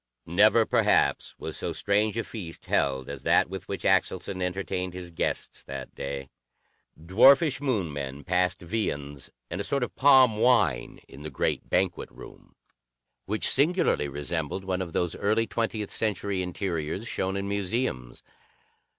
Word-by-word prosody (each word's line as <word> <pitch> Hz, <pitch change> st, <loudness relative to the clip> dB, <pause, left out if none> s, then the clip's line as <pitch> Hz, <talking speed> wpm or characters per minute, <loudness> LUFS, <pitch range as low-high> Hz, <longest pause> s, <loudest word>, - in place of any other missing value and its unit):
Never, -, -, +4 dB
perhaps, -, -, +2 dB
was -, -, -5 dB
so -, -, -2 dB
strange 105 Hz, +2 st, +1 dB
a 115 Hz, -, 0 dB
feast 90 Hz, -8 st, -8 dB
held 65 Hz, -2 st, 0 dB
as 70 Hz, -1 st, -7 dB
that -, -, +3 dB
with 95 Hz, -, -7 dB
which 100 Hz, -, -5 dB
Axelson 95 Hz, 0 st, +1 dB
entertained 90 Hz, 0 st, -3 dB
his 90 Hz, -1 st, -7 dB
guests 85 Hz, -, -3 dB
that 70 Hz, -1 st, -7 dB
day. 70 Hz, -1 st, -6 dB, 0.7 s
Dwarfish 130 Hz, -, +5 dB
Moon 105 Hz, -, -1 dB
men 70 Hz, 0 st, -5 dB
passed 90 Hz, +1 st, 0 dB
viands 70 Hz, -8 st, -3 dB, 0.2 s
and 90 Hz, +4 st, -3 dB
a -, -, -3 dB
sort 140 Hz, +4 st, 0 dB
of -, -, -5 dB
palm 130 Hz, -5 st, +6 dB
wine 105 Hz, -, +2 dB
in 70 Hz, -, -13 dB
the 75 Hz, -, -6 dB
great 70 Hz, -, -2 dB
banquet 90 Hz, -1 st, 0 dB
room, -, -, -14 dB, 0.7 s
which 105 Hz, +2 st, 0 dB
singularly 150 Hz, -, +2 dB
resembled 75 Hz, +5 st, -3 dB
one 95 Hz, -1 st, -2 dB
of 85 Hz, -3 st, -5 dB
those 90 Hz, -2 st, -1 dB
early 110 Hz, +3 st, +1 dB
twentieth 110 Hz, -3 st, -3 dB
century 100 Hz, -3 st, -1 dB
interiors 90 Hz, +1 st, -3 dB
shown 95 Hz, -3 st, -2 dB
in 100 Hz, 0 st, -3 dB
museums. 100 Hz, -, -2 dB
95 Hz, 150 wpm, -27 LUFS, 80-110 Hz, 0.7 s, palm